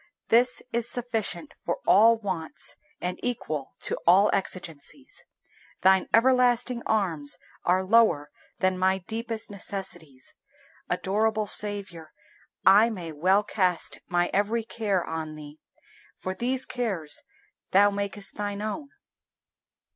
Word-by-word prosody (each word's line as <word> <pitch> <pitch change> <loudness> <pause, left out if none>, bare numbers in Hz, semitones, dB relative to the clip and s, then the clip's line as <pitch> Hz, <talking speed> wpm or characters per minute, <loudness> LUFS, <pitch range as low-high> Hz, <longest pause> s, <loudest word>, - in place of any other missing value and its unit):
This 245 +2 +4
is 235 0 0
sufficient 245 +4 -3
for - - -1
all 225 +2 +6
wants 185 -7 -2 0.2
and 180 +1 -3
equal 155 - -3
to - - -1
all 195 +4 +6
exigencies. 185 - -4 0.6
Thine 190 0 +4
everlasting 245 0 +3
arms 170 -10 +1 0.3
are 185 +1 +2
lower 185 -9 +3 0.3
than 185 -1 +1
my 190 +1 +3
deepest 225 +3 -5
necessities. 175 -9 -6 0.6
Adorable 215 +2 0
Saviour, 195 -7 -2 0.5
I 205 +4 +7
may 180 -7 -6
well 185 +7 +3
cast 185 -5 -1
my 175 0 +1
every 215 +3 +1
care 210 -5 -1
on 160 -1 -5
Thee, 150 0 -11 0.6
for 185 - -4
these 250 +6 -1
cares 205 -12 -2 0.5
Thou 205 +2 +5
makest 200 0 -4
Thine 205 0 -4
own. 280 +7 -4
200 Hz, 115 wpm, -26 LUFS, 175-225 Hz, 0.6 s, I